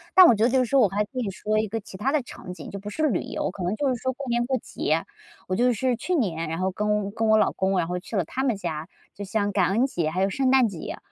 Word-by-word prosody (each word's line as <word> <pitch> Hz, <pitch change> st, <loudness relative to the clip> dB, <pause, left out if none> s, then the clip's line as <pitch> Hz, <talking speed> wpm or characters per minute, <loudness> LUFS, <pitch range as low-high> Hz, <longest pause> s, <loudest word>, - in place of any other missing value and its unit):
但 375 Hz, -1 st, +10 dB
我 290 Hz, -, +7 dB
觉 215 Hz, +1 st, +2 dB
得 -, -, +4 dB
就 260 Hz, +1 st, +3 dB
是 -, -, +4 dB
说 275 Hz, +3 st, +3 dB
我 220 Hz, -, +6 dB
还 205 Hz, +3 st, 0 dB
可 -, -, -11 dB
以 225 Hz, -, -1 dB
说 215 Hz, +3 st, -1 dB
一 215 Hz, -, 0 dB
个 225 Hz, +2 st, -3 dB
其 195 Hz, -, -11 dB
他 270 Hz, +8 st, 0 dB
的 305 Hz, -, +2 dB
场 180 Hz, -6 st, -9 dB
景， -, -, -9 dB
就 200 Hz, -, -6 dB
不 205 Hz, +1 st, -7 dB
是 310 Hz, +7 st, 0 dB
旅 205 Hz, -, +1 dB
游， -, -, -3 dB
可 190 Hz, -, -7 dB
能 185 Hz, +4 st, 0 dB
就 275 Hz, +4 st, 0 dB
是 255 Hz, -, +1 dB
说， 260 Hz, +2 st, -2 dB
过 275 Hz, +2 st, -7 dB
年 240 Hz, 0 st, +1 dB
过 260 Hz, +1 st, 0 dB
节， -, -, -1 dB, 0.5 s
我 185 Hz, -, +1 dB
就 245 Hz, +2 st, +3 dB
是 245 Hz, +2 st, 0 dB
去 360 Hz, +9 st, -1 dB
年， 170 Hz, -, -1 dB
然 165 Hz, +1 st, -3 dB
后 185 Hz, 0 st, 0 dB
跟 210 Hz, 0 st, -1 dB
跟 225 Hz, +1 st, -1 dB
我 220 Hz, 0 st, +5 dB
老 -, -, +3 dB
公， 190 Hz, 0 st, 0 dB
然 175 Hz, -, +2 dB
后 180 Hz, 0 st, -2 dB
去 200 Hz, -, -8 dB
了 190 Hz, -, +2 dB
他 260 Hz, +11 st, -3 dB
们 245 Hz, -5 st, +2 dB
家， 165 Hz, -5 st, -4 dB, 0.3 s
就 205 Hz, -, -7 dB
像 205 Hz, +1 st, 0 dB
感 185 Hz, -1 st, +2 dB
恩 230 Hz, +6 st, +3 dB
节 170 Hz, -, -1 dB
还 180 Hz, +4 st, -2 dB
有 195 Hz, -, +2 dB
圣 260 Hz, +6 st, +1 dB
诞 260 Hz, -3 st, +5 dB
节， 170 Hz, -5 st, -6 dB
210 Hz, 335 characters per minute, -25 LUFS, 190-250 Hz, 0.5 s, 但